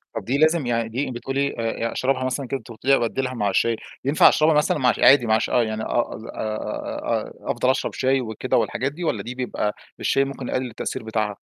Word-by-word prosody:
طَب - - -4
دي 135 +4 0
لازم 155 -2 +3
يعني 115 -1 0
دي 130 +3 -2
بتقولي 135 +3 -2
آآ، 115 0 -1
أشربها 130 0 0
مثلًا 130 +1 -2
كده، 135 - -2
أنتِ - - -16
قٌلتِ 115 +2 -12
لي 135 0 +6
أبدّلها 130 +2 -1
مع 105 -4 0
الشاي، 115 +4 +2 0.3
ينفع 145 +3 +6
أشربها 155 +1 +3
مثلًا 150 0 +2
مع 125 -3 +3
الش - - 0
عادي 135 -3 +7
مع 110 0 +3
ش - - -2
آه، 120 - +3
يعني 110 0 -3
آه، 120 - 0
أظ 110 - -10
أ - - -9 1.0
أ - - -5
أفضل 130 - 0
أشرب 130 - 0
شاي 130 0 +1
وكده 110 -2 -1
والحاجات 135 +3 0
دي 175 +4 -7
والّا 110 -10 -1
دي 125 +2 -6
بيبقى 125 -4 -2 0.2
الشاي 135 0 +2
ممكن 135 -2 -6
يقلِّل 130 -1 -2
التأثير 115 - -5
بتاعها؟ 110 -1 -1
125 Hz, 230 wpm, -23 LUFS, 115-135 Hz, 1.0 s, عادي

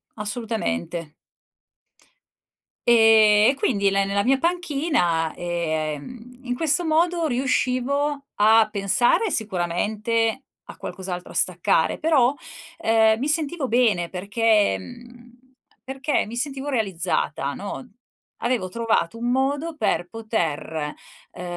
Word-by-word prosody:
assolutamente. 205 - -4 1.7
Ehm, 220 -2 +6
e - - +2
quindi 200 -7 +1
la 195 0 +1
nella 200 +1 0
mia 265 +2 +3
panchina, 290 - 0
ehm, 175 - -4
in 245 -1 -3
questo 325 +4 +1
modo 335 +1 +1
riuscivo 275 +2 0
a 220 +1 +5
pensare 220 - +2
sicuramente 220 +5 -1 0.3
a - - -10
qualcos'altro, 180 -2 -6
a - - -11
staccare, - - +1
però, 285 -5 +3 0.4
ehm, 225 -6 +3
mi 270 - -1
sentivo 305 -2 -1
bene 220 -8 +2
perché 210 - +1
mhmm, 240 - -13 0.5
perché 270 +2 -1
mi 230 - -7
sentivo 270 +2 -3
realizzata, 205 - -1
no, - - -6 0.6
avevo 240 -6 -1
trovato 230 -2 -1
un 240 +1 -1
modo 285 +5 -1
per 175 -11 0
poter, 160 -8 -3 0.4
ehm, 180 - -9
230 Hz, 110 wpm, -23 LUFS, 195-265 Hz, 1.7 s, Ehm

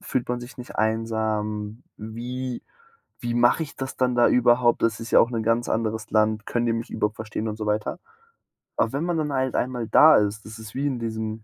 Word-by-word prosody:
fühlt 125 -2 -2
man 125 0 -2
sich 120 +3 -10
nicht 125 - -9
einsam? 110 -1 -1
Wie 120 +3 -5 0.6
Wie 120 0 -2
mache 120 +6 +3
ich 145 - -10
das 135 0 -5
dann 125 -1 +2
da 120 - +5
überhaupt? 120 -1 +3
Das 115 -2 +1
ist 115 - -7
ja - - +7
auch 115 - +4
'ne 115 - -1
ganz 115 +2 +1
anderes 110 -1 -2
Land. 110 -1 +2
Können 120 0 -1
die 115 - +2
mich 115 0 -4
überhaupt 105 +1 -1
verstehen 110 0 -4
und 105 0 -4
so 110 - -4
weiter?“ 105 0 -1 0.8
Aber 115 - +1
wenn 140 +4 -1
man 175 -2 0
dann 150 -2 -1
halt 130 -1 0
einmal 125 -3 -1
da 155 +5 +7
ist, 105 +1 -1
das 110 +1 -9
ist 110 0 -10
wie 140 +2 0
in 130 -3 -2
diesem 110 -1 -4
115 Hz, 220 wpm, -24 LUFS, 110-125 Hz, 0.8 s, ja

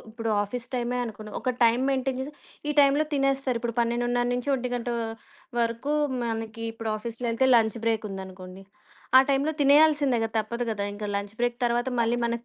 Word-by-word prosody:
ఇప్పుడు 225 0 -3
ఆఫీస్ 235 +4 -5
టైమే 245 0 -1
అనుకుందాం. 215 -2 -8
ఒక 255 - 0
టైమ్ 235 +2 +4
మెయింటైన్ 265 -1 0
జేసి 280 +3 -5 0.4
ఈ - - +1
టైంలో 285 +1 +5
తినేస్తారిప్పుడు 270 -4 0
12:30 240 +1 +1
నుంచి 245 +2 -2
1:00 245 -2 -3 0.7
వరకు 235 +4 0 0.3
మనకి 225 -1 -4
ఇప్పుడు 225 -1 -4
ఆఫీస్‌లో 235 +2 -5
ఎళ్తే 260 +3 +2
లంచ్ 225 0 +3
బ్రేక్ 225 -1 0
ఉందనుకోండి. 190 0 -9 0.5
ఆ - - +9
టైంలో 280 +3 +1
తినేయాల్సిందే 285 -3 +5
గదా! 225 0 -5
తప్పదు 235 +3 -4
గదా! 200 -2 -2
ఇంకా 205 0 -5
లంచ్ 200 +1 -5
బ్రేక్ 245 0 0
తర్వాత 240 +1 0
మళ్ళీ 230 +1 +2
మనకు 235 0 -2
235 Hz, 165 wpm, -26 LUFS, 225-260 Hz, 0.7 s, ఆ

